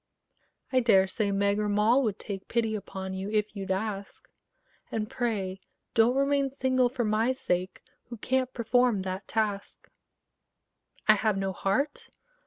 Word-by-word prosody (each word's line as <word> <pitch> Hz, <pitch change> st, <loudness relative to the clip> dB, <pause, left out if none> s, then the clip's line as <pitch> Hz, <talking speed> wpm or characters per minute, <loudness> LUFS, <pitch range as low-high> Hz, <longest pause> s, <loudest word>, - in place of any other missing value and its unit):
I 255 Hz, -, +5 dB
dare 205 Hz, -6 st, +5 dB
say 200 Hz, +2 st, -1 dB
Meg 200 Hz, +1 st, +1 dB
or 210 Hz, 0 st, 0 dB
Moll 215 Hz, +6 st, +4 dB
would 215 Hz, -6 st, -1 dB
take 195 Hz, -2 st, -6 dB
Pity 225 Hz, -2 st, 0 dB
upon 190 Hz, -2 st, -5 dB
you, 190 Hz, +1 st, -4 dB
if 215 Hz, 0 st, -1 dB
you'd 195 Hz, -1 st, -4 dB
ask: 200 Hz, 0 st, -4 dB, 0.6 s
And 215 Hz, -1 st, -2 dB
pray 200 Hz, -6 st, -2 dB, 0.3 s
don't 230 Hz, +3 st, +4 dB
remain 275 Hz, 0 st, +2 dB
single 260 Hz, -2 st, +1 dB
for 250 Hz, -1 st, -2 dB
my 220 Hz, +3 st, +2 dB
sake 185 Hz, -7 st, -2 dB, 0.2 s
Who 235 Hz, -, -9 dB
can't 260 Hz, +3 st, 0 dB
perform 240 Hz, -3 st, +2 dB
that 190 Hz, +1 st, -5 dB
task. 210 Hz, -3 st, -3 dB, 1.2 s
I 215 Hz, -, +9 dB
have 215 Hz, -1 st, +1 dB
no 195 Hz, -1 st, -1 dB
heart? 265 Hz, +12 st, -1 dB
215 Hz, 150 wpm, -28 LUFS, 195-245 Hz, 1.2 s, I